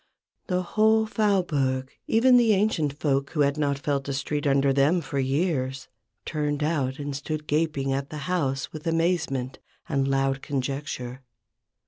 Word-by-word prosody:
The 185 Hz, -1 st, 0 dB
whole 220 Hz, +4 st, +3 dB
Faubourg, 155 Hz, -12 st, 0 dB, 0.2 s
even 250 Hz, +3 st, +5 dB
the 230 Hz, -3 st, +5 dB
ancient 160 Hz, -8 st, 0 dB
folk 140 Hz, -2 st, +1 dB
who 155 Hz, -, -1 dB
had 140 Hz, 0 st, +3 dB
not 140 Hz, -2 st, +1 dB
felt 140 Hz, -1 st, -2 dB
a -, -, -1 dB
street 145 Hz, +2 st, -2 dB
under 135 Hz, 0 st, +3 dB
them 140 Hz, +6 st, +3 dB
for 140 Hz, -3 st, -3 dB
years, 135 Hz, -1 st, -1 dB, 0.4 s
turned 150 Hz, -2 st, -1 dB
out 140 Hz, -4 st, 0 dB
and 145 Hz, -1 st, -4 dB
stood 150 Hz, +2 st, -4 dB
gaping 150 Hz, -3 st, 0 dB
at 135 Hz, +1 st, -3 dB
the 150 Hz, -2 st, -6 dB
house 140 Hz, -7 st, -1 dB
with 155 Hz, +1 st, -7 dB
amazement 165 Hz, -6 st, 0 dB, 0.3 s
and 135 Hz, -2 st, 0 dB
loud 135 Hz, 0 st, +1 dB
conjecture. 135 Hz, -2 st, -4 dB
145 Hz, 150 wpm, -26 LUFS, 135-165 Hz, 0.4 s, even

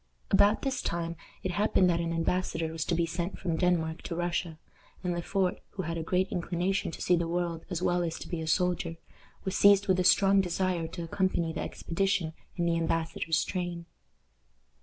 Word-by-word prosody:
About 205 Hz, +2 st, +5 dB
this 270 Hz, -2 st, -1 dB
time 170 Hz, 0 st, -2 dB, 0.3 s
it 185 Hz, -, -1 dB
happened 200 Hz, -1 st, +3 dB
that 170 Hz, -, +1 dB
an 170 Hz, 0 st, -1 dB
embassador 165 Hz, -1 st, -1 dB
was 160 Hz, -1 st, -2 dB
to 175 Hz, -, 0 dB
be 170 Hz, 0 st, +2 dB
sent 170 Hz, +3 st, -3 dB
from 170 Hz, -4 st, -2 dB
Denmark 165 Hz, -2 st, +1 dB
to 170 Hz, -, -3 dB
Russia, 175 Hz, -1 st, -2 dB, 0.5 s
and 180 Hz, -1 st, 0 dB
Le 175 Hz, -, -2 dB
Fort, 190 Hz, +1 st, 0 dB
who 190 Hz, -, -3 dB
had 165 Hz, 0 st, -3 dB
a 165 Hz, -, -2 dB
great 180 Hz, +3 st, +1 dB
inclination 180 Hz, +2 st, -1 dB
to -, -, -8 dB
see 180 Hz, -, +3 dB
the 170 Hz, -1 st, 0 dB
world 170 Hz, -1 st, -2 dB
as 180 Hz, -1 st, -3 dB
well 175 Hz, 0 st, +2 dB
as 165 Hz, -2 st, -2 dB
to -, -, -8 dB
be 170 Hz, -3 st, -3 dB
a 160 Hz, -, -4 dB
soldier, 175 Hz, -1 st, +1 dB, 0.5 s
was 190 Hz, -, -2 dB
seized 200 Hz, 0 st, +6 dB
with 185 Hz, -1 st, +3 dB
a -, -, +3 dB
strong 195 Hz, +2 st, +5 dB
desire 180 Hz, -2 st, -1 dB
to 170 Hz, +1 st, -6 dB
accompany 170 Hz, -1 st, 0 dB
the -, -, -3 dB
expedition 185 Hz, -2 st, -1 dB, 0.2 s
in 175 Hz, -, 0 dB
the 170 Hz, 0 st, +2 dB
embassador's 165 Hz, -1 st, 0 dB
train. 175 Hz, -2 st, -3 dB
175 Hz, 200 wpm, -29 LUFS, 165-185 Hz, 0.5 s, seized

